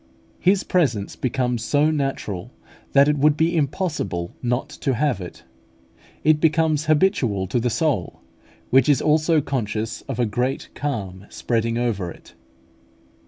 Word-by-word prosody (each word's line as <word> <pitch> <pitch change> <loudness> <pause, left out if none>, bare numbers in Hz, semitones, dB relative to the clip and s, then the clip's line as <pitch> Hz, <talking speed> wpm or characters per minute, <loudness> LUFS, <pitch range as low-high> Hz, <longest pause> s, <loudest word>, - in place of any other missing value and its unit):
His 190 +1 +3
presence 125 - 0
becomes 125 -2 -1
so 150 +2 +2
natural, 135 - -3 0.4
that 140 +1 +6
it 150 -1 +1
would 150 +1 +4
be 165 +2 +2
impossible 145 - -2
not 125 +1 -1
to 135 -4 -2
have 125 -5 0
it: 90 - -9 0.8
it 155 0 +4
becomes 155 -1 +2
habitual 145 - +2
to 100 +6 -1
the 120 +1 0
soul, 115 - -1 0.5
which 135 +2 +5
is 145 - +4
also 155 +1 +3
conscious 115 -4 -3
of - - -3
a 120 - +3
great 125 +5 -2
calm 100 -9 -4
spreading 115 -1 -1
over 110 -7 -1
it. 75 - -14
135 Hz, 140 wpm, -22 LUFS, 115-150 Hz, 0.8 s, that